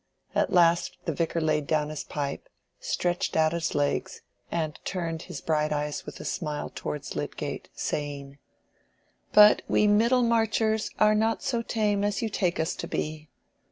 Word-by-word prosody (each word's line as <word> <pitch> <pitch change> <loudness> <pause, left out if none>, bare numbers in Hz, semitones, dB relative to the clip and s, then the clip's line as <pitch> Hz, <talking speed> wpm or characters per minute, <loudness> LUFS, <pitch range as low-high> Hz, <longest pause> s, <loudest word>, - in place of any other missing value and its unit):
At - - +1
last 170 -1 +3
the 165 - -1
Vicar 165 +2 -1
laid 155 -2 0
down 150 -1 +1
his 155 -1 -5
pipe, 140 -2 -4 0.3
stretched 175 -2 -1
out 160 0 +3
his 170 -1 -2
legs, 145 -1 -1 0.3
and 155 -3 -2
turned 165 -3 -3
his - - -8
bright 155 -1 0
eyes 150 0 -2
with - - -8
a - - -8
smile 150 -4 -3
towards 145 -1 -5
Lydgate, - - -4
saying— 140 -1 -4 0.9
"But 210 0 +8
we 210 - +3
Middlemarchers 225 0 +3
are 215 0 +5
not 220 +1 +1
so 235 -3 0
tame 210 -3 0
as 205 +1 0
you 225 - 0
take 185 -4 0
us 160 +2 0
to - - -5
be. 155 0 -4
165 Hz, 155 wpm, -27 LUFS, 150-210 Hz, 0.9 s, But